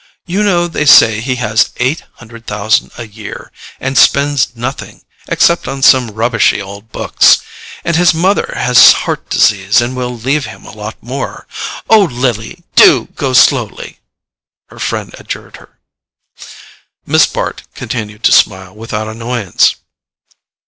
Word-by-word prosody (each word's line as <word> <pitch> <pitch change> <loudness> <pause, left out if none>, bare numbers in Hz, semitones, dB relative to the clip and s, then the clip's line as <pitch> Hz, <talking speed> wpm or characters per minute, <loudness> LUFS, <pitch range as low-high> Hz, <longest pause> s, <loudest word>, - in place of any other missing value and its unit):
"You 190 +3 -2
know 180 -4 +1
they 150 -3 -3
say 110 -6 +6
he 130 +2 -2
has 110 -3 0
eight 130 +6 -1
hundred 115 -1 -15
thousand 105 +1 0
a 120 - -7
year—and 110 +4 -6
spends 140 -3 +2
nothing, 125 +4 -7 0.2
except 170 0 +1
on 135 -1 -5
some 130 -3 +5
rubbishy 115 +2 0
old 100 +2 -10
books. - - +3 0.5
And 170 - 0
his 175 +1 +4
mother 185 +4 0
has 125 0 +6
heart - - -4
disease 100 +1 +2
and 120 +2 -2
will 125 -1 -4
leave 135 +5 -1
him - - -12
a - - -11
lot 105 +1 -8
more. 130 +3 -6 0.4
OH, 220 -3 +5
LILY, 125 - -3
DO 125 -6 +5
GO 135 -2 -2
SLOWLY," 120 -3 +1 0.7
her - - -15
friend - - -4
adjured - - -8
her. - - -20 1.3
Miss - - +3
Bart - - -4
continued 105 -2 -6
to - - +4
smile 95 -2 +2
without 110 0 -5
annoyance. 115 -3 -1
120 Hz, 140 wpm, -13 LUFS, 110-140 Hz, 1.3 s, say